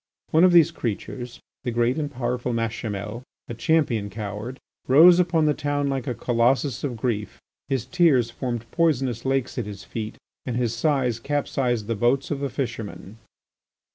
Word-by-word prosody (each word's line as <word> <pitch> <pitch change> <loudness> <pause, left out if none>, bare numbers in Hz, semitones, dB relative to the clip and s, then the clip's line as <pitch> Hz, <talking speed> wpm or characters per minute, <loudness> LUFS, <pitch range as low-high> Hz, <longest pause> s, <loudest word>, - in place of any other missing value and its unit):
One 160 +2 +5
of 185 - +7
these 170 -2 +6
creatures, 120 -2 -5 0.2
the 125 - -2
rich 120 +5 +1
and 145 -2 -2
powerful 125 -2 -2
Machimel, 115 -1 -3 0.3
a - - -5
champion 115 -5 +1
coward, 105 +4 -6 0.3
rose 170 +7 +8
upon 170 -3 +2
the 150 - +3
town 145 -1 -1
like 135 -3 -2
a 125 - -1
colossus 125 +4 +1
of 130 -5 -2
grief; 105 -4 -2 0.3
his 130 -4 -1
tears 130 -6 +3
formed 120 -2 -4
poisonous 135 -8 +1
lakes 135 -2 0
at 115 - -3
his 100 -2 -8
feet 110 +2 -6 0.3
and 125 - -3
his 120 -2 0
sighs 125 -3 +1
capsized 125 -4 -1
the 115 - -1
boats 120 +7 +1
of 145 - -1
the 140 0 -2
fishermen. 115 -4 -5
125 Hz, 165 wpm, -24 LUFS, 115-140 Hz, 0.3 s, rose